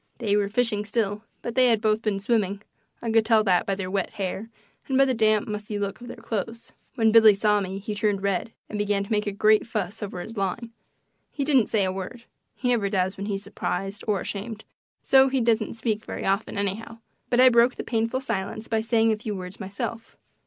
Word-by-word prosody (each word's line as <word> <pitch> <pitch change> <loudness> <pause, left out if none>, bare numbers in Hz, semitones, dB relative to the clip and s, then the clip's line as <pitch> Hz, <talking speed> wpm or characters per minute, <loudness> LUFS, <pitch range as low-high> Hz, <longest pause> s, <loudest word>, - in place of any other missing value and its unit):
They 210 -4 0
were 205 -1 +1
fishing 215 -2 +1
still, 210 0 -2 0.2
but 235 - -4
they 255 0 +5
had 230 -3 +3
both 215 0 +1
been 210 -3 -1
swimming 200 -2 0 0.4
I 230 - -1
could 225 0 +4
tell 220 -1 +4
that 185 -4 +2
by 195 - +1
their 185 -1 -5
wet 195 -2 -1
hair 200 +2 -4 0.4
and 265 - +1
by 275 - +6
the 260 - +1
damp, 215 -2 +2
mussy 210 0 -4
look 200 +2 -3
of 240 - -9
their 245 - -8
clothes. 230 +1 -5 0.2
When 225 -3 +3
Billy 220 -2 +8
saw 210 0 +2
me 190 0 -4
he 205 +2 -5
turned 205 -1 0
red 200 +2 -1 0.2
and 210 - -5
began 205 -1 +1
to 200 - -10
make 210 -1 +1
a - - 0
great 215 +3 +3
fuss 215 -1 -3
over 195 -3 -5
his 225 +5 -8
line. 200 +4 -2 0.6
He 285 - -3
didn't 270 -5 +3
say 210 -3 +2
a 185 - 0
word; 195 +6 -7 0.3
he 250 - -1
never 220 -5 +1
does 190 -1 0
when 200 +1 -5
he's 200 -1 -3
surprised 195 +1 -4
or 205 -2 +1
ashamed, 215 +3 -5 0.4
so 265 0 +5
he 265 0 +1
doesn't 230 -2 +1
speak 220 -1 -2
very - - -6
often, 195 +2 0
anyhow; 205 +3 -3 0.3
but 245 - +2
I 255 0 +8
broke 235 +1 +4
the - - -5
painful 230 +2 -1
silence 215 -2 -4
by 225 -1 0
saying 225 0 +2
a 215 - 0
few 215 -1 -4
words 180 0 -8
myself. 210 +3 -6
215 Hz, 225 wpm, -25 LUFS, 200-230 Hz, 0.6 s, Billy